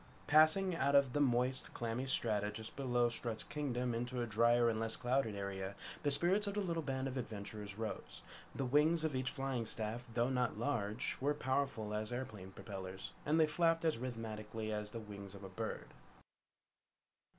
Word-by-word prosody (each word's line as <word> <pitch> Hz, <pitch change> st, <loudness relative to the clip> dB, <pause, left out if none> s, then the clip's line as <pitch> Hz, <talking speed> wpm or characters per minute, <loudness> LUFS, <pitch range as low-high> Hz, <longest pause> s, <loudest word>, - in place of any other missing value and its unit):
Passing 155 Hz, +5 st, +5 dB
out 140 Hz, -3 st, +2 dB
of 140 Hz, -3 st, +5 dB
the 145 Hz, -, +1 dB
moist, 125 Hz, -1 st, +1 dB
clammy 120 Hz, +2 st, -2 dB
strata 105 Hz, -5 st, +2 dB
just 110 Hz, +1 st, -7 dB
below 120 Hz, -3 st, +2 dB
Strut's 115 Hz, -1 st, -1 dB
Kingdom 125 Hz, -4 st, -2 dB
into 120 Hz, +2 st, -2 dB
a 120 Hz, -, +1 dB
dryer 120 Hz, +2 st, +4 dB
and 110 Hz, -1 st, +1 dB
less 115 Hz, 0 st, -1 dB
clouded 125 Hz, -3 st, +1 dB
area, 100 Hz, -1 st, -4 dB, 0.3 s
the 145 Hz, -, +2 dB
spirits 180 Hz, +8 st, +3 dB
of 200 Hz, -, -2 dB
the -, -, +1 dB
little 170 Hz, -4 st, 0 dB
band 135 Hz, -2 st, -2 dB
of 135 Hz, 0 st, -4 dB
adventurers 105 Hz, -3 st, -5 dB
rose. 110 Hz, -1 st, -5 dB, 0.3 s
The 135 Hz, -, -1 dB
wings 150 Hz, +5 st, +4 dB
of 155 Hz, -4 st, 0 dB
each 130 Hz, 0 st, 0 dB
flying 135 Hz, -4 st, -2 dB
staff, 110 Hz, +2 st, -2 dB
though 120 Hz, +3 st, +1 dB
not 125 Hz, -4 st, +1 dB
large, 115 Hz, -3 st, -1 dB
were 145 Hz, +2 st, +2 dB
powerful 130 Hz, -6 st, -1 dB
as 105 Hz, +2 st, -2 dB
airplane 110 Hz, -7 st, -5 dB
propellers, 95 Hz, -1 st, -7 dB, 0.2 s
and 155 Hz, +2 st, +4 dB
they 160 Hz, -, +7 dB
flapped 165 Hz, +1 st, +2 dB
as 155 Hz, -8 st, +2 dB
rhythmically 110 Hz, -3 st, -4 dB
as 105 Hz, 0 st, -3 dB
the 115 Hz, -, -6 dB
wings 100 Hz, -2 st, -9 dB
of 100 Hz, -, -10 dB
a 95 Hz, -, -6 dB
bird. 95 Hz, -, -4 dB
120 Hz, 180 wpm, -37 LUFS, 110-140 Hz, 0.3 s, they